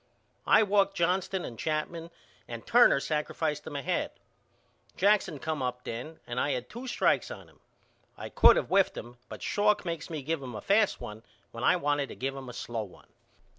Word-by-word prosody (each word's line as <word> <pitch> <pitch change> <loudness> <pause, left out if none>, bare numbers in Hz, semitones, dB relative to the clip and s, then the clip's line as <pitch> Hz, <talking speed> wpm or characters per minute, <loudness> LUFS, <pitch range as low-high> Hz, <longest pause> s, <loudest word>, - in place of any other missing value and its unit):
I 220 - +6
walked 200 -1 +2
Johnston 185 +1 0
and 115 -3 -8
Chapman 160 +2 -2 0.4
and 115 -1 -7
Turner 240 -11 +6
sacrificed 150 0 -2
them 150 - -7
ahead. 140 -2 -1 0.9
Jackson 200 -5 +3
come 155 +1 -3
up 125 -1 -3
then 125 +8 -6
and 120 +1 -3
I 145 - +1
had 125 0 -4
two 245 +3 -7
strikes 245 - +1
on - - -9
him. - - -23 0.6
I - - -7
could - - +6
of - - -1
whiffed 195 0 +3
him 120 +1 -9
but - - -8
Schalk 210 -1 +2
makes 165 -2 -4
me 155 -4 -5
give 160 +1 -2
him 125 -4 -7
a - - -5
fast 205 +1 +2
one 105 +1 -8 0.3
when - - -7
I - - +5
wanted 145 -1 0
to - - -8
give 135 +1 -3
him 135 -2 -8
a - - -8
slow 115 -1 -4
one. 100 -4 -12
155 Hz, 195 wpm, -29 LUFS, 125-190 Hz, 0.9 s, I